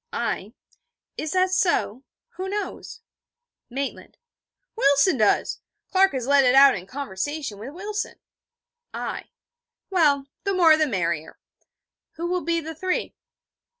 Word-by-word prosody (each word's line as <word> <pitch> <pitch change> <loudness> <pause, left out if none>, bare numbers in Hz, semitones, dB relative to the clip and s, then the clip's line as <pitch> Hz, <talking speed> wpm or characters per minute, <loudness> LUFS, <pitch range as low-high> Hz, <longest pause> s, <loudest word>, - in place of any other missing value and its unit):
I: - - -3 0.6
'Is 310 - -4
that 370 0 +2
so? 335 - +1 0.3
Who 380 -5 -6
knows?' 420 +3 -5 0.7
Maitland: 270 +2 -5 0.6
'Wilson 280 - +4
does. 215 -3 +2 0.3
Clark 385 -2 +4
has 255 -3 -2
let 280 +1 +5
it 250 0 +4
out 275 0 +8
in 185 0 -7
conversation 275 0 -4
with 265 +8 -8
Wilson.' 415 +3 -4 0.8
I: - - -4 0.7
'Well, 290 -7 +3 0.2
the 395 -1 0
more 330 -4 +6
the 310 0 +2
merrier. 170 - -2 0.8
Who 335 - -5
will 360 +1 -1
be 335 0 0
the 320 0 -6
three?' 365 +4 -2
305 Hz, 125 wpm, -24 LUFS, 260-370 Hz, 0.8 s, out